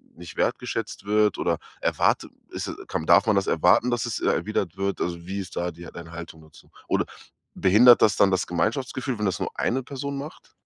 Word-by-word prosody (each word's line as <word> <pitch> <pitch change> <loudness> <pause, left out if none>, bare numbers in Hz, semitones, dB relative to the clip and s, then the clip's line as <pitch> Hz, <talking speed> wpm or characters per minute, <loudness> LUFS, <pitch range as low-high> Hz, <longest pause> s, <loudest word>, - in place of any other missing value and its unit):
nicht 85 -1 -11
wertgeschätzt - - -2
wird 105 0 +2
oder 85 -2 0 0.2
erwartet - - +1 0.2
ist - - -4 0.2
kann 80 - -3
darf 85 +5 +6
man 110 - +4
das 100 - +1
erwarten, 90 +9 +3
dass 120 -1 0
es, 120 - -3
äh, - - 0
erwidert 95 -4 -1
wird? 100 0 -2
Also, 85 -1 -3
wie 100 +1 -3
ist 95 -2 -7
da 90 - -1
die 85 +1 -12
deine 85 -1 -10
Haltung 85 -1 -9
dazu? 80 0 -19 0.2
Oder - - +1 0.5
behindert 115 +6 +6
das 105 -3 +4
dann 100 - +4
das 95 - 0
Gemeinschaftsgefühl, 125 +6 -2
wenn 105 - 0
das 95 - -2
nur - - -2
eine 130 +3 0
Person 140 +1 -5
macht? 145 +3 -9
100 Hz, 205 wpm, -25 LUFS, 85-120 Hz, 0.5 s, darf